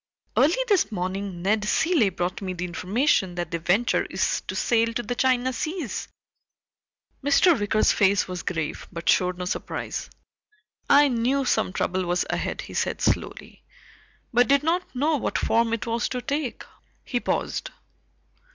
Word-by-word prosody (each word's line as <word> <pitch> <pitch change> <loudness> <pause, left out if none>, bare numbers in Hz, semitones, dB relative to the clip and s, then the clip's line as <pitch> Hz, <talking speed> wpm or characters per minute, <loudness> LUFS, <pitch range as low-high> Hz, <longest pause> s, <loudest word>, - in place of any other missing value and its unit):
"Early 315 - +4
this 385 - +2
morning 185 -1 -4
Ned 210 +2 +2
Cilley 315 - +2
brought 180 +1 -3
me 185 -2 -3
the 180 0 -4
information 190 - 0
that 175 -2 -4
the 170 - -2
Venture 195 +9 +2
is - - 0
to - - -4
sail 230 -1 +2
to 240 - -1
the 245 - -3
China 255 0 +1
seas." 310 - -4 1.2
Mr. 285 +2 +4
Wicker's 205 +1 +2
face 200 0 +3
was 180 -2 -5
grave 160 -4 -4
but 170 -2 -7
showed 180 -1 +3
no 180 - -4
surprise. 180 - -4 0.8
"I 290 +1 +7
knew 260 +2 +1
some 220 -6 +1
trouble 185 0 -1
was 175 +1 +1
ahead," - - -2
he - - -10
said - - -1
slowly, - - -2 0.7
"but 245 +1 +4
did 280 +1 +3
not 340 -1 -1
know 300 +4 +2
what - - -2
form 230 0 +2
it 230 0 -2
was 230 +1 -1
to 250 - -3
take." 285 -3 -3 0.4
He 245 - -2
paused. - - -2
230 Hz, 160 wpm, -25 LUFS, 185-270 Hz, 1.2 s, I